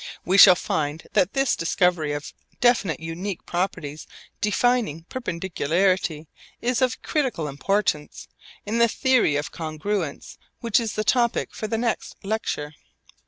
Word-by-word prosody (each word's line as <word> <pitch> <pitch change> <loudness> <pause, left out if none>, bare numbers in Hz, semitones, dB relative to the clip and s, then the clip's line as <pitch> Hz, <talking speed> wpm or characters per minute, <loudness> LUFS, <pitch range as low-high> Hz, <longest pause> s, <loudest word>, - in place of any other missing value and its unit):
We 190 +2 +3
shall 185 -3 +10
find 155 -2 -3
that 195 -3 +2
this 270 -1 +2
discovery 165 -2 +1
of 145 0 -6 0.3
definite 235 -9 +2
unique 165 +4 -5
properties 165 -4 -3 0.3
defining 210 -6 +1
perpendicularity 180 - -1 0.3
is 250 +2 0
of 255 -1 0
critical 260 - -1
importance 150 +1 -1 0.4
in 220 +3 -1
the 235 - +6
theory 250 - +2
of 145 +1 -2
congruence 160 +1 -4 0.2
which 230 -1 +2
is 225 -2 -3
the 215 - -1
topic 235 +1 +1
for 215 - -4
the 225 - -1
next 230 0 -2
lecture. 195 -8 -3
190 Hz, 130 wpm, -24 LUFS, 160-230 Hz, 0.4 s, shall